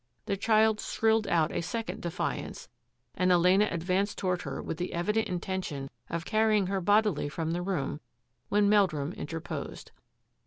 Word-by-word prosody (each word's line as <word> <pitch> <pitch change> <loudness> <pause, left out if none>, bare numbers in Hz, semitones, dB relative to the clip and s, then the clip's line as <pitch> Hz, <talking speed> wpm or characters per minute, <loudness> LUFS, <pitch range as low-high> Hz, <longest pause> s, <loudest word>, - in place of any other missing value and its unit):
The 200 - 0
child 220 +1 +3
shrilled 220 0 +1
out 165 -2 +2
a - - -1
second 225 +6 -4
defiance, 170 +1 -4 0.4
and 185 0 +2
Elena 180 +4 +5
advanced 185 +4 -1
toward 180 -2 -1
her - - -5
with 160 - -4
the 180 - -3
evident 210 +6 0
inten 185 +1 -3
tion 140 -5 -6 0.2
of 170 0 -3
carrying 215 -2 +3
her 195 +1 -1
bodily 205 -6 +2
from 160 +2 -3
the 175 +1 -1
room 175 -6 -2 0.5
when 205 0 +3
Meldrum 180 -7 +2
interposed. 165 +2 -6
185 Hz, 155 wpm, -29 LUFS, 170-210 Hz, 0.5 s, Elena